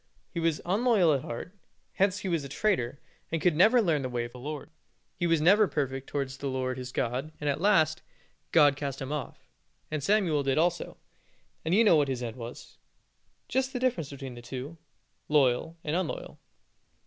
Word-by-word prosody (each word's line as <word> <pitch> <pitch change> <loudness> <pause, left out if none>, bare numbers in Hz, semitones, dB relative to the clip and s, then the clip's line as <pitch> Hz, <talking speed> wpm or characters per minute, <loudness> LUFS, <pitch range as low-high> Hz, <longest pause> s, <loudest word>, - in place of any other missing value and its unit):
He 170 - -3
was 165 -2 +1
unloyal 200 -3 +3
at 135 - -2
heart, 120 +11 -6 0.4
hence 195 0 +2
he 195 - -4
was 165 -5 0
a 140 - -7
traitor, 140 - 0 0.3
and 165 0 +2
never 215 +10 +6
could 230 - +4
learn 155 -5 +2
the 130 - -3
way 120 -1 -2
of 120 - -9
the 125 - -11
Lord. 150 +4 -6 0.4
He 175 - 0
was 165 -1 +3
never 200 +7 +5
perfect 135 -3 -2
towards 135 -1 -3
the 140 - -4
Lord 130 -1 -2
his 125 0 -6
God, 130 +6 -2
and, 150 - -3
at 145 +2 0
last, 160 -6 +3 0.5
God 145 -4 +6
cast 140 -1 -4
him 135 0 -5
off, 150 -4 -5 0.4
and 155 -1 -2
Samuel 185 -6 +2
did 135 0 0
also, 175 +1 0 0.7
and 165 +3 +1
you 225 - +6
know 190 -7 +6
what 145 -2 +3
his 130 -2 -3
end 115 -2 -4
was. 120 -1 -9 0.7
Just 265 +2 0
the 250 - -2
difference 240 - 0
between 135 -2 -7
the 120 - -10
two 130 +6 -7 0.5
loyal 150 +2 +2
and 155 +1 -1
unloyal. 180 -3 -3
150 Hz, 195 wpm, -29 LUFS, 135-175 Hz, 0.7 s, never